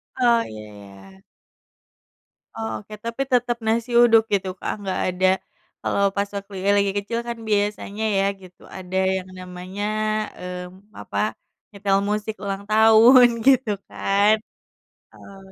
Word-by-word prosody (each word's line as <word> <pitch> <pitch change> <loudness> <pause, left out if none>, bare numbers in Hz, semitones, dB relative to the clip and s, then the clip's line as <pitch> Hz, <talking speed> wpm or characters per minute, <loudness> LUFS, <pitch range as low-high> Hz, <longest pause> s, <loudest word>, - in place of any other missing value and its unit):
Oh 240 -2 +3
iya 110 0 -9
iya. 100 -2 -15 1.3
Oh 110 0 -4
oke, 105 - -13
tapi 235 +3 -3
tetep 245 -1 +1
nasi 230 +2 0
uduk 230 -2 +6
gitu, 190 -1 0
Kak, - - -3 0.2
gak 190 - -1
ada 185 +1 +1 0.5
kalau 200 - 0
pas 200 0 0
waktu 200 0 -7
ya 200 - +1
lagi 200 -1 +2
kecil 225 +3 -2
kan 235 0 -4
biasanya 205 0 -1
ya 195 - +2 0.2
gitu, 180 -1 -16 0.2
ada 190 0 -5 0.2
yang 185 0 -5
namanya 185 +2 -7 0.6
eee, 180 0 -6 0.4
apa, - - -7 0.5
nyetel 200 -1 0
musik 210 +1 -2
ulang 200 0 -4
tahun 225 +3 +7 0.2
gitu 260 -3 +4 0.2
kan. 200 +2 +2 0.8
Eee, 195 - -14
200 Hz, 135 wpm, -22 LUFS, 185-225 Hz, 1.3 s, tahun